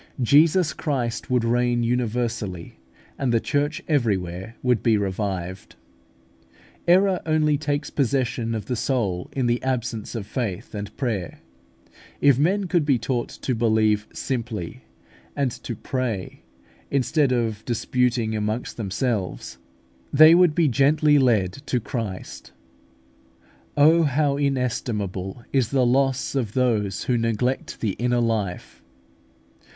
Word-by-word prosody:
Jesus 155 +6 +4
Christ 130 -5 -3
would 125 -2 +2
reign 120 0 +1
universally, 115 - -2 0.4
and 135 -3 0
the 115 - +3
Church 145 +5 -1
everywhere 100 - -1
would 125 -4 +2
be 115 -2 +3
revived. 95 -2 -4 1.1
Error 185 +1 +4
only 155 -1 +2
takes 145 0 -2
possession 125 -4 0
of 110 - -4
the 125 - -2
soul 105 -8 -1
in 130 -2 -1
the 120 0 +1
absence 120 -4 -3
of 110 -4 -4
faith 105 -5 -4
and 105 -1 -6
prayer. 110 -10 -3 0.8
If 140 -3 +4
men 190 +7 +2
could 175 -2 +1
be 140 -3 +2
taught 120 +1 -2
to 130 - -3
believe 110 -2 +2
simply 115 -9 -4 0.5
and 140 -3 0
to 120 - -5
pray, 115 -5 -4 0.4
instead 140 +1 +1
of 115 -3 -1
disputing 120 -1 0
amongst 110 +3 -3
themselves, 110 -1 -3 0.5
they 155 +3 +8
would 175 -3 +5
be 170 -3 +3
gently 145 +3 +4
led 110 -8 +2
to 125 - +1
Christ. 110 -5 -6 1.2
Oh, 160 +4 +6
how 145 -1 +1
inestimable 115 -7 -2
is 130 -5 +2
the 130 -2 +2
loss 135 +1 +1
of 120 -7 -2
those 110 -6 0
who 125 -2 +1
neglect 115 +3 -1
the 110 - 0
inner 120 0 +1
life! 110 -6 -2
120 Hz, 125 wpm, -23 LUFS, 110-140 Hz, 1.2 s, they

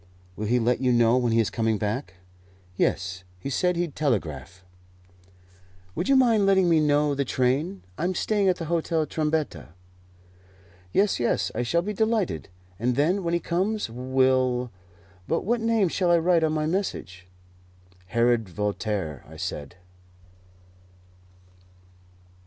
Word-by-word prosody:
"Will 105 - -4
he 120 +3 +2
let 125 +2 +1
you 130 -1 +2
know 120 0 +4
when 120 -2 +1
he 115 - +3
is 110 - +1
coming 110 -1 0
back?" 105 -3 -3 0.6
"Yes; 95 0 -1 0.2
he 140 - -5
said 180 +6 +1
he'd 170 -3 -2
telegraph." 95 - -2 1.3
"Would - - -3
you 275 - +5
mind 230 -6 +4
letting 190 -2 +4
me 165 -2 +4
know 150 -1 +2
the 140 0 0
train? 135 +9 -1 0.2
I 170 - 0
am 185 +1 -1
staying 205 +1 +1
at 185 - +2
the 165 - -6
Hotel 165 -1 0
Trombetta." 150 - -2 1.2
"Yes, 200 - +2
yes, 120 - 0
I - - -2
shall 170 +8 +1
be 210 +3 -3
delighted; 210 - -1 0.3
and 120 +2 0
then, 175 +8 +1
when 170 0 0
he - - +1
comes, 190 - -1
we'll 130 0 +1 0.6
But - - 0
what 235 +3 +1
name 225 -3 +2
shall 180 +1 0
I 170 - +5
write 170 0 +3
on 155 - +2
my 155 -1 0
message?" 155 - -3 0.8
"Herod 115 -1 +1
Voltaire," 100 - -3
I - - -12
said. 70 +3 -5
140 Hz, 145 wpm, -25 LUFS, 115-175 Hz, 1.3 s, you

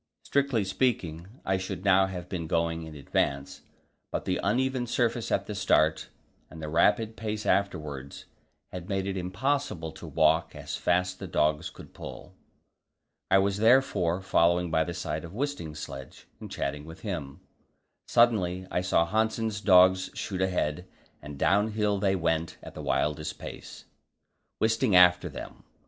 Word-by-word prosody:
Strictly 140 -6 +1
speaking, 95 -5 -1 0.2
I 95 0 +1
should 95 0 -5
now 95 -1 +5
have 90 -2 -6
been 85 -4 -4
going 80 0 0
in 80 - -10
advance, 70 -1 -2 0.5
but - - -3
the 90 - 0
uneven 125 +4 0
surface 120 0 0
at - - +1
the 105 - -5
start 80 -5 +2 0.4
and 80 - -11
the 75 -1 -5
rapid 105 +7 +2
pace 110 -1 -4
afterwards 75 -8 -2 0.5
had 90 +1 -7
made 95 -1 -1
it 100 -1 -2
impossible 95 - -2
to - - -10
walk - - +2
as - - -5
fast 90 +1 0
the - - -6
dogs 75 0 +1
could - - -14
pull. - - -9 1.0
I - - +6
was 100 0 +2
therefore 105 -6 +3
following 85 -1 +2
by 80 0 +2
the 85 - -5
side 80 -3 -3
of 85 +3 -9
Wisting's 125 - -3
sledge, 70 -3 -8
and - - -8
chatting 75 +1 -3
with 80 +3 -11
him. 80 -10 -5 0.7
Suddenly 95 -6 +3
I 90 - 0
saw 90 -2 +2
Hanssen's 110 +2 0
dogs 95 -2 +5
shoot 95 -2 -3
ahead, 90 -2 -1 0.3
and 75 -1 -9
downhill 105 +3 +2
they 95 -1 +2
went 80 -2 -1
at - - -9
the - - -7
wildest 75 +1 -1
pace, - - -9 0.7
Wisting 110 -1 +2
after 90 0 +6
them. - - -9
95 Hz, 155 wpm, -28 LUFS, 80-105 Hz, 1.0 s, I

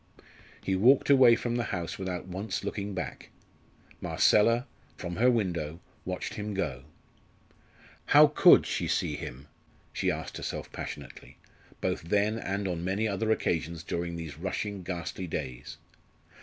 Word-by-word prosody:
He 95 - 0
walked 130 +9 +5
away 130 -4 +8
from 120 0 -2
the 120 - -1
house 85 0 -4
without 95 -2 -4
once 95 +4 -4
looking 100 -1 -4
back. 90 - -5 0.7
Marcella, 115 +4 +3 0.3
from, 90 -1 -5
her 125 +3 +5
window, 85 -9 -1 0.3
watched 90 0 -4
him 105 -1 -4
go. 80 -9 -3 1.2
"How - - +8
could - - +6
she - - -2
see - - 0
him?" 65 +4 -8 0.5
she - - 0
asked - - -4
herself - - -5
passionately, - - -8 0.4
both - - -1
then 105 +6 +1
and 100 -1 -2
on 85 -2 -3
many 100 +5 0
other 105 +2 -1
occasions 85 -6 0
during 85 0 -3
these 80 -3 -7
rushing, 95 +2 -3
ghastly 90 0 -5
days. 65 -6 -5
95 Hz, 140 wpm, -29 LUFS, 85-105 Hz, 1.2 s, away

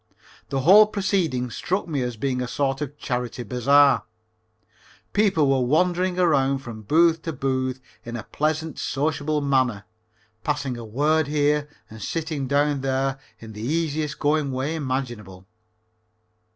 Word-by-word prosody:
The 135 - -1
whole 200 +9 +8
proceeding 185 - -1
struck 185 - -2
me 145 -5 -2
as 125 -2 -3
being 130 +1 -1
a 125 - -2
sort 135 +2 -1
of 145 0 -5
charity 125 -2 -3
bazaar. 140 +5 +4 1.1
People 195 -8 +3
were 135 -1 +2
wandering 180 +6 +1
around 140 -6 +2
from 115 -3 -8
booth 165 +7 +3
to 165 - -4
booth, 130 -3 -2 0.2
in 120 0 -7
a 115 - -5
pleasant 155 +3 -2
sociable 150 +1 -1
manner, 130 -7 +1 0.6
passing 145 -3 -2
a 120 - -7
word 145 +7 +1
here 150 0 +1 0.2
and 110 0 -12
sitting 155 -4 -3
down 145 0 +1
there 135 0 -1 0.2
in 110 -1 -11
the 105 - -8
easiest 155 +2 -1
going 150 -1 +1
way 130 +4 -2
imaginable. 120 - -4
140 Hz, 140 wpm, -24 LUFS, 130-155 Hz, 1.1 s, whole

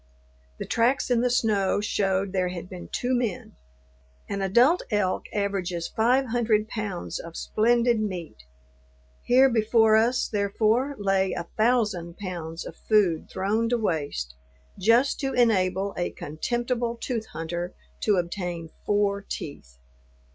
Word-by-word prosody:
The - - -5
tracks 245 +3 +1
in 235 -1 +3
the 250 - +2
snow 210 -6 +2
showed 195 -2 0
there 185 -2 +1
had 180 0 -6
been 180 -1 -9
two 250 +1 -2
men. 240 -7 -2 0.7
An 200 0 -3
adult 240 - +4
elk 205 -4 0
averages 190 -4 -2
five 245 +4 +2
hundred 225 -3 +1
pounds 210 -6 -4
of 165 0 -9
splendid 235 +1 +2
meat; 175 - -5 0.8
here 260 +2 +5
before 220 -2 +4
us, 235 +3 +2
therefore, 220 +6 +1
lay 195 -1 +1
a - - -4
thousand 210 -7 +1
pounds 170 -4 -6
of - - -8
food 195 -7 +2
thrown 215 +4 0
to 245 - +2
waste 145 - -2 0.5
just 230 +7 +3
to 270 -1 -2
enable 195 -5 +2
a 175 - -1
contemptible 240 - -2
tooth 230 -4 -3
hunter 170 +2 -5 0.2
to 210 - +2
obtain 175 -2 -3 0.2
four 205 -1 +1
teeth. 65 - -8
205 Hz, 135 wpm, -26 LUFS, 180-235 Hz, 0.8 s, here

